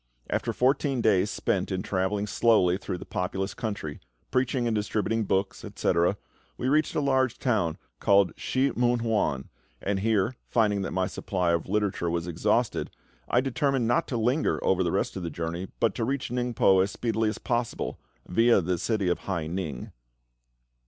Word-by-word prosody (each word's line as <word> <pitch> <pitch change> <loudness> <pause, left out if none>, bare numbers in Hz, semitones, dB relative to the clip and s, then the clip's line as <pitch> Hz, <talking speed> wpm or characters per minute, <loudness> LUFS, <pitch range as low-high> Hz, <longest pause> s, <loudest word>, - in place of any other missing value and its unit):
After - - 0
fourteen 135 +1 +1
days 105 -3 +3
spent 95 -2 -1
in 95 -1 -2
travelling 100 +2 0
slowly 105 -4 +3
through 95 -1 -4
the - - -9
populous 95 0 -2
country, 100 -10 -4 0.3
preaching 130 -1 +1
and 115 - +1
distributing 110 +1 0
books, 95 0 -1
etc., 85 +3 +1 0.4
we - - -2
reached 150 +3 +2
a - - +2
large 130 -3 +2
town 105 -11 0 0.2
called 100 -4 +4
Shih 130 +1 0
mun 120 -1 +2
wan, 105 - 0 0.3
and 100 0 -1
here, 110 +2 +1
finding 105 -4 +2
that 95 - -2
my 95 0 0
supply 90 -2 -1
of 85 +1 -1
literature 100 -4 0
was 85 0 -1
exhausted, 85 -1 0 0.4
I 125 - +4
determined 135 -1 0
not 120 - +2
to 125 - -2
linger 125 +7 +1
over 95 -1 +2
the 85 - 0
rest - - -1
of - - -4
the 85 - -3
journey, 85 +3 -4
but 115 -4 +2
to 115 - -2
reach 135 +3 -1
Ningpo 120 -6 +3
as 95 - +1
speedily 110 0 0
as 105 - -4
possible, 120 -1 -2 0.3
viâ 115 -1 +4
the 90 -1 0
city 105 -2 0
of 90 - +1
Hai 85 -5 -3
ning. 80 -6 -4
105 Hz, 170 wpm, -27 LUFS, 90-120 Hz, 0.4 s, called